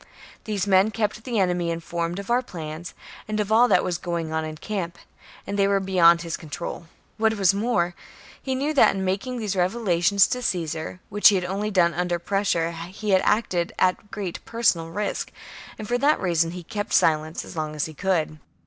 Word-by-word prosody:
These 205 -3 -1
men 195 +1 +4
kept 215 +1 -2
the 240 -3 -2
enemy 180 -3 +1
informed 170 +1 -3
of 200 +3 -5
our 245 +1 +3
plans, 165 -6 -8 0.3
and 215 0 -2
of 210 0 -1
all 235 +3 +6
that 180 - +3
was 175 -1 -2
going 170 -2 -3
on 160 0 0
in 155 0 -6
camp, 175 -1 -4 0.5
and 200 0 -3
they 195 - +4
were 200 0 +2
beyond 175 -3 +4
his 165 -1 -4
control. 165 +2 -7 0.3
What 220 0 +2
was 195 -2 +3
more, 200 -5 0 0.5
he 265 -1 -2
knew 285 +4 -1
that, 275 - +5
in 190 0 -2
making 195 +7 -2
these 210 -4 -2
revelations 190 0 +3
to 250 - -2
Caesar, 165 -3 -3
which 205 +1 +6
he 205 - +2
had 180 -1 0
only 200 +3 -2
done 175 -4 +3
under 175 +1 -1
pres 195 +4 -1
sure, 165 -2 +1
he 180 +5 -5
had 190 -1 +5
acted 185 -6 +1
at 185 +3 +1
great 195 -5 -5
personal 205 -8 +1
risk, 205 +5 -3 0.5
and 215 - -7
for 245 +2 0
that 290 +3 +3
reason 170 -3 +1
he 180 +1 -7
had 165 - -20
kept 205 -2 -3
silence 155 0 +2
as - - -10
long 155 -1 -3
as 150 - -1
he 160 - -8
could. 160 -3 -1
185 Hz, 205 wpm, -24 LUFS, 170-210 Hz, 0.5 s, all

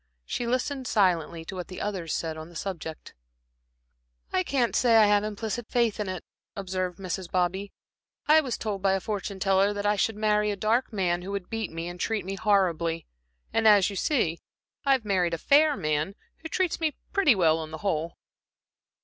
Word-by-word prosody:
She 235 - -3
listened 255 +2 -1
silently 170 -5 +1
to - - -7
what 180 -1 -5
the 185 - -8
others 185 -6 -3
said 160 -1 -2
on 160 +1 -8
the 175 - -16
subject. 160 -3 -6 1.2
"I 185 - +3
can't 240 +4 0
say 235 -2 +4
I 220 - +7
have 205 0 +3
implicit 215 +2 -4
faith 235 -3 +1
in 205 -2 -2
it," 185 -3 -5 0.3
observed 185 -2 -3
Mrs. 185 -1 -4
Bobby. 185 +3 -1 0.6
"I 310 +1 +7
was 260 -5 -3
told 205 -3 -3
by 195 0 +3
a 195 - +1
fortune 200 -1 -4
teller 195 +1 +3
that 205 0 -4
I 205 0 +3
should 215 +2 0
marry 210 0 +2
a 205 - -1
dark 220 +7 +1
man, 180 -4 0
who 185 - -7
would 195 -3 -5
beat 225 -3 -2
me 165 +1 -5
and 175 0 -7
treat 215 -3 -1
me 195 - -3
horribly; 170 -5 +1 0.5
and 225 -1 +3
as 205 -2 +6
you - - -6
see, 185 - 0 0.5
I've 265 -5 +3
married 180 -4 +1
a - - -5
fair 290 - +4
man 155 +5 -1 0.2
who 320 - -7
treats 365 -1 0
me 315 -2 0 0.2
pretty 380 - +5
well 165 -4 +3
on 160 -1 -5
the 160 - -6
whole." 165 -3 -1
195 Hz, 195 wpm, -27 LUFS, 175-220 Hz, 1.2 s, I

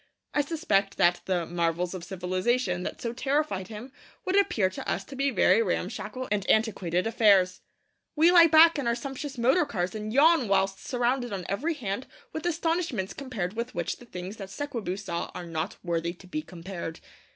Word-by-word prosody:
I 295 - +3
suspect 275 -11 0
that 175 0 +3
the 180 -3 0
'marvels 170 +1 -1
of 185 -2 -6
civilization' 185 +2 -1
that - - -5
so 235 -1 -3
terrified 270 -7 -1
him 225 +5 -9 0.3
would 375 - 0
appear 245 - +3
to 185 - -6
us - - -1
to 270 - -10
be 275 +1 +1
very 230 -2 +4
ramshackle 230 +6 -3
and 205 -2 +1
antiquated 190 -5 +1
affairs. 200 -5 +4 0.5
We 325 +3 +5
lie 340 -2 +8
back 320 0 +7
in 265 - -2
our 235 - +2
sumptuous 270 +2 -6
motor 260 +9 +4
cars 180 -10 -2
and 215 0 -5
yawn 295 0 +5
whilst 195 0 +1
surrounded 245 0 0
on 190 -3 -4
every 295 - -1
hand 235 -2 -4 0.3
with 315 +2 -3
astonishments 330 - -1
compared 225 -10 -4
with 235 +2 -4
which 170 -1 -2
the 245 - -15
things 185 +1 -7
that 195 -2 -7
Sekwebu 225 -6 -4
saw 180 -4 -4
are 180 - -5
not 160 -1 -4
worthy 170 -1 -1
to 185 - -16
be 305 +12 -4
compared. 175 - -7
215 Hz, 185 wpm, -27 LUFS, 185-270 Hz, 0.5 s, lie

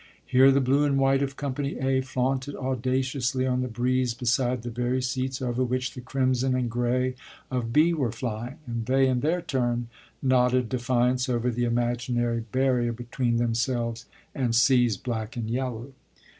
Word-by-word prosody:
Here 130 +2 +6
the 135 - +4
blue 135 +3 +3
and 140 -2 +2
white 135 0 +3
of 135 -1 -2
company 140 0 -3
"A" 130 0 +1
flaunted 130 +1 -2
audaciously 130 +1 -1
on 125 -1 +1
the 125 - -1
breeze 125 +1 0
beside 125 -1 0
the 120 - -5
very 125 +2 -1
seats 130 +1 -2
over 125 0 0
which 130 +1 -2
the 125 - -8
crimson 130 0 0
and 125 -2 -1
gray 125 +2 0 0.4
of 120 -3 -2
"B" 155 +6 +4
were 135 -8 0
flying 120 +2 -5
and 115 -2 -4
they 135 +1 +4
in 130 -1 +1
their 165 +6 0
turn 120 -5 -1 0.3
nodded 125 -2 +2
defiance 125 +1 +1
over 120 0 0
the 120 +1 -1
imaginary 120 0 0
barrier 130 -3 +1
between 120 0 -1
themselves 115 0 -1 0.3
and 120 -4 0
"C's" 120 -3 +4
black 115 0 -4
and 115 -2 -3
yellow. 125 0 -3
125 Hz, 165 wpm, -26 LUFS, 120-130 Hz, 0.4 s, Here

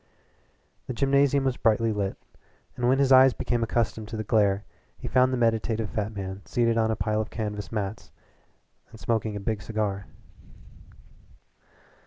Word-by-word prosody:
The - - -3
gymnasium 140 +1 +3
was 130 -2 0
brightly 115 0 +2
lit, 100 -2 -2 0.6
and 125 0 +1
when 130 - +4
his 135 -1 +2
eyes 130 0 +8
became 120 -1 -1
accustomed 115 -1 -1
to 110 - -6
the 110 - -3
glare 105 -3 +2 0.3
he - - -7
found 130 0 +3
the 130 - 0
meditative 115 -1 0
fat 105 0 -2
man 95 0 -5
seated 115 -1 +1
on 110 -1 +2
a 110 - +1
pile 110 +1 0
of 110 - -5
canvas 105 -2 -5
mats 105 -1 -4 0.9
smoking 110 -1 -1
a - - -3
big 105 +1 -2
cigar. 100 -3 -3
110 Hz, 155 wpm, -26 LUFS, 105-120 Hz, 0.9 s, eyes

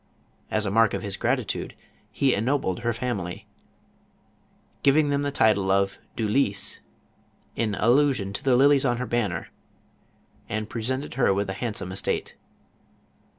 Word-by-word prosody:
As 110 0 0
a 100 - -1
mark 110 0 +4
of - - -4
his 100 -2 -3
gratitude - - -2 0.4
he 135 -2 +2
ennobled 115 -4 0
her 120 - 0
family, 110 -7 -4 1.4
giving 145 +2 +4
them 140 0 +1
the 145 0 -1
title 105 -7 +3
of 100 0 +1
" - - -38
du 110 - -1
Lys," 105 -3 0 0.8
in 110 -3 -1
allusion 120 -4 +2
to - - -5
the 130 -2 +4
lilies 140 +1 +5
on 120 -3 +1
her 125 - -2
banner, 105 -9 -2 1.0
and 110 0 -2
pre 115 - -4
sented 130 +5 -3
her 135 - +3
with 100 -1 -1
a - - -3
handsome 105 -3 -4
estate. 95 - -2
115 Hz, 150 wpm, -25 LUFS, 100-135 Hz, 1.4 s, lilies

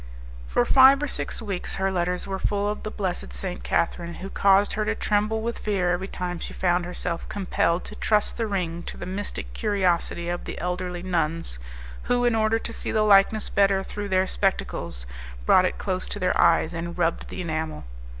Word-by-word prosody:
For 60 - +2
five 270 +2 +7
or - - 0
six 250 - -3
weeks 195 -4 -4
her 190 0 0
letters 180 0 -1
were 195 -1 -4
full 205 +1 0
of 210 0 -2
the 215 - -4
blessed 185 - -3
St. - - -4
Catherine, 170 - -1
who 195 +1 -7
caused 200 +1 +4
her 215 - 0
to 220 +1 0
tremble 215 +1 0
with 235 +1 -3
fear 190 -4 0
every 180 +2 -1
time 180 -2 -4
she - - -5
found 175 -1 +1
herself 175 -1 -4
compelled 180 -3 0
to - - -8
trust 210 -1 +1
the 230 - -1
ring 175 -4 -2
to - - -3
the - - -6
mystic 190 +3 -5
curiosity 185 -5 0
of 175 0 -3
the - - -6
elderly 180 0 -3
nuns, 165 - -1 0.5
who, 245 0 +2
in 240 - +3
order 220 0 +2
to 230 0 -5
see - - -4
the 215 -1 +2
likeness 205 +1 +5
better 195 -1 +3
through 205 +1 -5
their 185 0 +3
spectacles, 190 - -2 0.4
brought 185 - +6
it - - -1
close 185 -2 -2
to - - -1
their 185 -2 +1
eyes, 160 - +4
and 170 +1 -5
rubbed 170 -1 0
the - - -7
enamel. 160 -2 -3
185 Hz, 200 wpm, -25 LUFS, 175-205 Hz, 0.5 s, five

